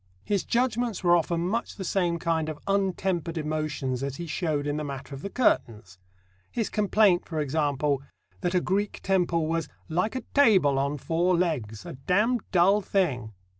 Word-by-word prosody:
His 200 -3 0
judgments 240 -4 0
were 175 -1 +5
often 170 0 0
much 230 +5 -2
the 195 - -6
same 175 -2 0
kind 165 -2 0
of 155 - -5
untempered 190 -4 0
emotions 150 -4 -2
as 140 -1 -3
he 170 - -5
showed 155 -2 -1
in 145 0 -1
the 155 - -2
matter 140 -1 -6
of 135 - -7
the 200 - -5
curtains 105 - 0 0.5
his 225 -3 -2
complaint, 205 -3 +3
for 160 -2 -3
example, 145 -1 0 0.4
that 180 -1 -1
a 180 - +3
Greek 200 +3 -1
temple 175 -4 +1
was 165 +1 -1 0.2
"like 180 +9 0
a 255 - -2
table 190 - +5
on 140 +2 -1
four 170 +4 +1
legs: 120 - -2
a - - -6
damned 200 - +1
dull 195 +3 +4
thing!" 140 - -1
170 Hz, 170 wpm, -27 LUFS, 145-195 Hz, 0.5 s, were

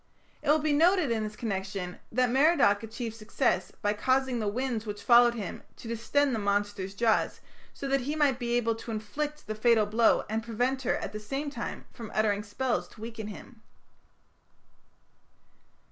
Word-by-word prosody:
It 300 - -3
will 300 - +6
be 305 -1 0
noted 330 -1 +4
in 225 -1 0
this 210 0 -5
connection 195 -4 -4
that 250 +1 +2
Merodach 265 -7 +4
achieved 225 0 -5
success 215 -1 0
by 205 0 +2
causing 260 +3 +1
the 215 - -1
winds 230 0 -2
which 205 0 -5
followed 240 0 +6
him 205 -6 -5
to - - -11
distend 250 +5 +1
the 225 - 0
monster's 200 -1 -1
jaws, 225 0 +1 0.3
so 275 - -6
that 275 -1 +2
he 290 +5 -2
might 285 -4 +2
be 240 -1 0
able 230 -1 +1
to 225 +1 -9
inflict 290 +8 -4
the 215 - -3
fatal 220 0 +3
blow 220 +2 +3
and 220 +1 -1
prevent 245 +4 -1
her 250 - +1
at - - -4
the 215 - -4
same 275 +7 -4
time 240 -4 -5
from 225 -2 -8
uttering 210 -1 +2
spells 235 +4 -2
to 215 - -16
weaken 225 -1 -6
him. 220 +2 -11
230 Hz, 175 wpm, -29 LUFS, 210-265 Hz, 0.3 s, will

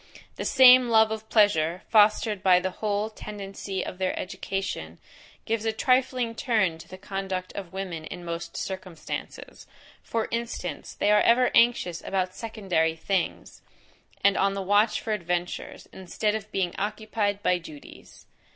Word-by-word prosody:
The - - -5
same 255 -1 +7
love 220 -1 +5
of 220 0 -5
pleasure, 180 -5 +3
fostered 210 -1 +4
by 185 -2 +5
the 185 +1 -2
whole 210 +2 -2
tendency 195 -2 -6
of 185 - -7
their 185 -1 -1
education, 185 - -4 0.5
gives 225 -1 -1
a 225 - +1
trifling 255 0 +1
turn 215 -9 0
to - - -12
the 185 - -10
conduct 190 -1 -4
of 190 -4 -7
women 185 -4 -5
in 175 - -8
most 170 0 -5
circumstances: 185 -5 -7 0.3
for 225 -1 -2
instance, 230 -9 -4
they 205 - +2
are 210 0 +5
ever 245 +1 +4
anxious 230 -8 +3
about 185 -1 -1
secondary 185 -8 -1
things; 185 +2 -3 0.6
and 200 0 +4
on 195 0 +2
the 195 - -3
watch 205 +3 +3
for 220 - -3
adventures, 175 -2 -4
instead 190 +3 -2
of 215 -1 -5
being 185 -3 -1
occupied 210 -1 -2
by 180 0 +2
duties. 155 -4 -13
195 Hz, 150 wpm, -26 LUFS, 180-220 Hz, 0.6 s, same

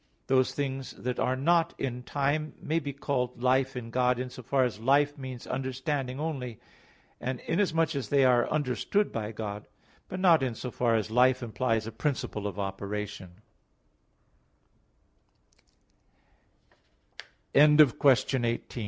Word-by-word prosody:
Those 130 -1 +2
things 135 -2 -4
that 125 0 -4
are 130 - +1
not 165 +5 +2
in 125 -2 -3
time 145 +4 -1
may 160 +2 -1
be 145 -3 -5
called 125 -3 -3
life 130 +1 +2
in 115 -2 -6
God 125 0 +2
in 125 0 -4
so 130 - -9
far 130 +2 +1
as 120 -4 -2
life 140 +4 +3
means 130 -4 -8
understanding 130 0 -3
only, 135 -8 -4 0.6
and 130 0 -3
inasmuch 165 -3 +1
as 130 -7 -3
they 140 -2 +4
are 125 -1 +3
understood 155 - 0
by 110 -1 -4
God; 105 -1 -6 0.4
but 185 - -5
not 175 -5 +5
in 125 -3 -1
so 125 +2 -6
far 115 -1 +1
as 110 0 -1
life 125 +2 +4
implies 115 -1 -1
a 115 - -5
principle 110 -4 -2
of 100 - -6
opera 100 +1 -3
130 Hz, 130 wpm, -28 LUFS, 120-140 Hz, 0.6 s, not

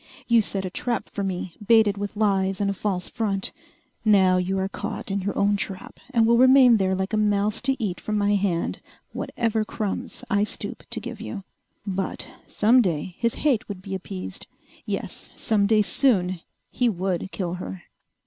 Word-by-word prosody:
You 235 -1 +5
set 195 -2 -2
a 185 - -4
trap 240 +5 -2
for 200 - -3
me, 185 -2 -3
baited 220 -2 +5
with 205 +1 -5
lies 195 -2 +1
and 200 -1 +1
a - - -2
false 190 -2 -2
front. 200 -4 -1 0.5
Now 190 -4 +5
you 185 +1 0
are 190 0 0
caught 200 0 -5
in 200 0 0
your 200 +2 -3
own 205 0 +3
trap 190 -1 -6
and 235 -4 +3
will 235 +1 +4
remain 255 -2 +7
there 190 -1 +1
like 190 +3 -3
a - - +2
mouse 210 0 +1
to 270 +1 +1
eat 200 -8 -3
from 215 0 -1
my 205 0 +2
hand 190 -4 0 0.3
whatever 225 -2 -1
crumbs 210 -1 -4
I 205 0 +2
stoop 210 -1 -4
to 235 - -3
give 230 0 -7
you." 215 -3 -6 0.4
But 190 -2 -3 0.2
some 235 +4 +4
day 175 -3 -1
his 235 -1 +1
hate 255 -9 +2
would 190 -2 -6
be 195 - -6
appeased. 95 - -6 0.4
Yes, - - -4
some 205 -2 +2
day 215 0 +4
soon 185 -8 +2 0.3
he 245 -1 +2
would 190 -2 -2
kill 175 -3 -3
her! 95 -1 -7
200 Hz, 185 wpm, -24 LUFS, 190-220 Hz, 0.5 s, remain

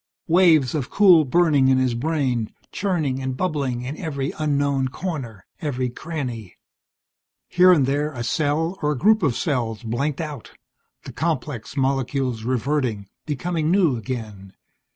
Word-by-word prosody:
Waves 165 -7 +4
of 140 -5 -2
cool 180 -6 +6
burning 150 -2 +3
in 130 0 +4
his 130 -2 +1
brain, 125 -4 -1 0.2
churning 155 -9 -1
and 130 -1 -3
bubbling 140 -9 -1
in 135 +4 -5
every 140 -5 -3
unknown 140 -3 +1
corner, 130 - -6 0.2
every 130 -5 -2
cranny. 125 - -6 0.9
Here 180 +1 +5
and 150 -7 +4
there 145 +3 0
a 120 -4 -5
cell, 160 +7 -1
or 150 -1 +1
a - - -5
group 215 - +4
of 140 -8 +1
cells, 120 -7 -2
blanked 135 +6 -2
out, 150 -3 -6 0.5
the - - -9
complex 145 -5 -3
molecules 135 -2 0
reverting, 125 -4 -1 0.2
becoming 155 +1 -1
new 175 -7 +3
again. 110 -5 -6
140 Hz, 140 wpm, -22 LUFS, 125-160 Hz, 0.9 s, cool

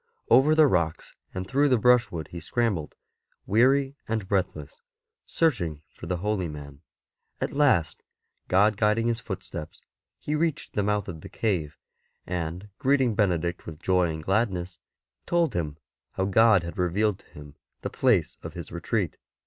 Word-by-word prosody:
Over 150 +4 +6
the 155 -1 +7
rocks 85 - 0 0.2
and 95 0 -5
through 140 +4 +2
the 125 - +4
brushwood 115 -9 +2
he 85 - -7
scrambled, 95 -3 -1 0.5
weary 135 +6 +3
and 110 -3 -2
breathless, 90 -7 -2 0.5
searching 85 - 0
for - - -10
the 90 - -1
holy 100 -1 -1
man. 70 -2 -9 0.6
At - - -2
last, 135 - +2 0.5
God 100 +3 +3
guiding 105 +2 +2
his 115 0 0
footsteps, 95 -7 -7 0.4
he 150 - -4
reached 155 0 -1
the 105 - +1
mouth 105 -1 0
of 80 -4 -7
the - - -10
cave, 85 -10 -2 0.5
and 90 +3 -4
greeting 135 -3 +3
Benedict 90 -5 0
with 80 -2 -8
joy 90 -1 +2
and 80 -1 -6
gladness, 95 -3 -1 0.5
told 170 -5 +2
him 75 -4 -3 0.4
how 95 - -1
God 105 -1 +5
had 85 +2 -7
revealed 95 +3 +1
to - - -23
him 75 -1 -12 0.3
the - - -4
place - - +1
of - - -8
his - - -7
retreat. - - -2
95 Hz, 155 wpm, -26 LUFS, 85-115 Hz, 0.6 s, the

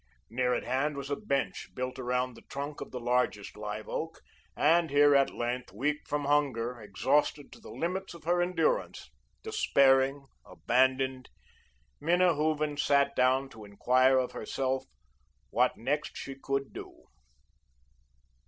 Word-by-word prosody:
Near 125 +1 +1
at - - -2
hand 135 +4 -1
was 140 0 -6
a - - +2
bench, 140 -9 -2
built 130 +1 -4
around 125 0 -1
the - - -14
trunk 140 +1 -5
of - - -6
the 125 - -6
largest 120 -4 0
live 105 0 -6
oak, 165 +1 -4 0.4
and 165 +2 +3
here, 145 0 +5
at 140 -1 +4
length, 120 +1 -4
weak 145 +9 -2
from 145 -1 -2
hunger, 125 -5 0
exhausted 140 +8 0
to - - -13
the 225 - -13
limits 185 +2 -3
of 170 - -13
her 175 +2 +2
endurance, 330 - -1 0.3
despairing, 140 - +3 0.2
abandoned, 130 0 0 0.7
Minna 175 +3 +3
Hooven 150 -1 0
sat 140 -1 +2
down 130 +2 +3
to 110 -4 -12
enquire 130 +6 +3
of 130 -1 0
herself 130 0 -2 0.7
what - - +2
next 145 +6 -2
she 135 - -6
could 135 0 -3
do. - - -10
135 Hz, 145 wpm, -30 LUFS, 125-150 Hz, 0.7 s, here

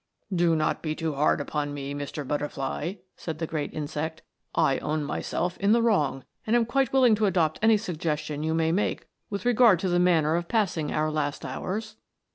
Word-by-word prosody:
" - - -46
Do 170 -1 +3
not 155 -1 0
be 155 -1 -2
too 160 -1 -2
hard 145 +2 +2
upon 145 0 -3
me, 140 0 -5
Mr. 145 0 -5
Butterfly," 150 +4 -2 0.2
said 160 -3 -5
the 165 - -2
great 155 -2 -3
insect; 155 +1 -4 0.2
" - - -22 0.2
I 135 - 0
own 155 0 -1
myself 175 +4 -2
in 200 +2 +4
the 235 - +4
wrong, 150 - +1 0.2
and 225 - +3
am 235 -1 +4
quite 265 +2 +1
willing 255 -4 +5
to 215 0 +2
adopt 165 -5 +1
any 220 0 +5
suggestion 155 -6 -3
you 160 +1 0
may 160 0 +2
make 195 +5 -1 0.2
with 200 0 -4
regard 240 -5 +6
to 190 - 0
the 175 0 +2
manner 165 -3 +3
of 170 0 -2
passing 180 -9 0
our 155 0 0
last 150 -2 -2
hours." 215 +3 -4
165 Hz, 205 wpm, -27 LUFS, 150-200 Hz, 0.2 s, regard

